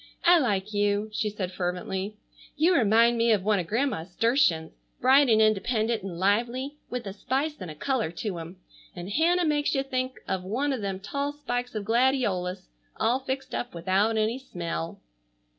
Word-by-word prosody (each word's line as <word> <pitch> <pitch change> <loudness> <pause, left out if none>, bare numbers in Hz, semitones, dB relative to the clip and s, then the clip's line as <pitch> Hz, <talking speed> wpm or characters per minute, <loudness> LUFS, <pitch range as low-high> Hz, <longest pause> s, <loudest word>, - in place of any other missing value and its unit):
"I 350 0 +7
like 210 -6 -1
you," 205 +1 +1
she 215 0 0
said 195 -3 -4
fervently. 185 +3 -3 0.4
"You 335 +4 +4
remind 230 -1 +4
me 230 0 +4
of 200 -3 0
one 210 -1 +2
of 175 - -4
Grandma's 220 -7 -1
sturtions, 225 - +2 0.3
bright 265 +2 +5
and 220 -1 +5
independent 220 +1 +2
and 185 -3 -6
lively, 240 +9 0
with 245 -2 -4
a 195 - -5
spice 275 +8 -2
and 180 - -5
a 155 - -8
color 255 - -1
to 175 +2 -4
'em, 165 +3 -9 0.4
and 175 +2 -6
Hannah 345 - +3
makes 295 -2 +1
you 270 - +1
think 255 -1 -3
of 190 -1 -2
one 260 +9 -1
of 255 - -3
them 195 -2 -3
tall 280 +8 -3
spikes 245 -4 -4
of 210 -2 -3
gladiolus 225 -6 +1 0.3
all 245 +3 +1
fixed 270 0 -4
up 245 -6 -4
without 195 +6 +1
any 220 +4 0
smell." 170 -8 -5
220 Hz, 175 wpm, -27 LUFS, 190-260 Hz, 0.4 s, I